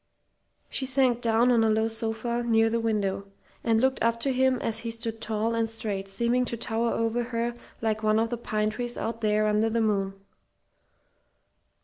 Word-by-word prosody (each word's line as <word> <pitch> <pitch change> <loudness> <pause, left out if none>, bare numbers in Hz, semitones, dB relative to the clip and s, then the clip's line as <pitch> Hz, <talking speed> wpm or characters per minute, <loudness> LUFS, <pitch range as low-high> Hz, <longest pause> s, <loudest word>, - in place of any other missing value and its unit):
She 265 - -2
sank 255 -2 +3
down 235 +1 +3
on 230 -2 +4
a 220 - +3
low 220 +1 +2
sofa 225 +1 -2
near 225 -1 +3
the 230 - +1
window, 200 -3 -1 0.4
and 225 -1 +3
looked 260 +2 +1
up 230 0 +2
to 270 +2 +1
him 260 0 +3
as 225 -2 -1
he 230 - -4
stood 225 -1 -5
tall 220 +1 -1
and 230 -1 0
straight, 210 -4 -4
seeming 235 +5 +1
to 235 - -2
tower 230 +1 -1
over 230 +1 0
her 235 0 -2 0.3
like 220 -1 0
one 215 0 +2
of 225 +1 +1
the 240 - -1
pine 215 -2 -1
trees 240 +1 -4
out 230 +1 -4
there 215 0 +2
under 215 +1 +2
the 230 +1 0
moon. 200 -3 0
225 Hz, 190 wpm, -27 LUFS, 220-235 Hz, 0.4 s, on